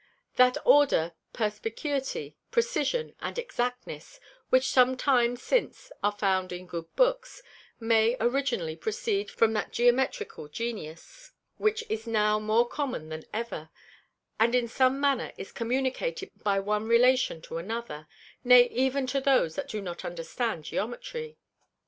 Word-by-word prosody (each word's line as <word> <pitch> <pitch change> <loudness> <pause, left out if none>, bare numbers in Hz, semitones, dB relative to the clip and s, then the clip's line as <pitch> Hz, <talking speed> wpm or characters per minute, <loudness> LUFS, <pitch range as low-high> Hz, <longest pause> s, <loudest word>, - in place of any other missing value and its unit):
That 250 0 +5
Order, 275 - +4 0.2
Perspicuity, 230 +6 -3
Precision 475 0 0
and - - -5
Exactness, 250 - -4 0.3
which 260 0 +4
some 255 0 +4
time 245 -3 +2
since - - -1
are 205 - +2
found 190 -3 0
in 180 +1 -6
good 170 -2 -6
Books, - - +1 0.4
may 225 +1 +3
originally 235 - 0
proceed 435 - -2
from 225 -1 +2
that 215 - -2
Geometrical 245 - +1
Genius, 230 - -7 0.2
which 435 +1 +1
is 220 +1 -4
now 210 -1 +2
more 220 +3 +2
common 255 - -4
than 155 0 -7
ever, 215 -8 -5 0.7
and 235 +2 +4
in 245 -1 +2
some 260 +3 +2
manner 280 -3 +1
is - - -8
communicated 265 - -2
by 200 -1 +2
one 210 +2 -1
Relation 245 -4 +4
to 165 - -5
another, 185 -6 -6 0.4
nay 245 -1 +7
even 265 +2 +1
to 270 +2 -1
those 260 - +3
that - - -5
do 210 -2 -4
not 175 -2 -6
understand 175 +2 -3
Geometry. 465 - -5
240 Hz, 135 wpm, -28 LUFS, 210-275 Hz, 0.7 s, nay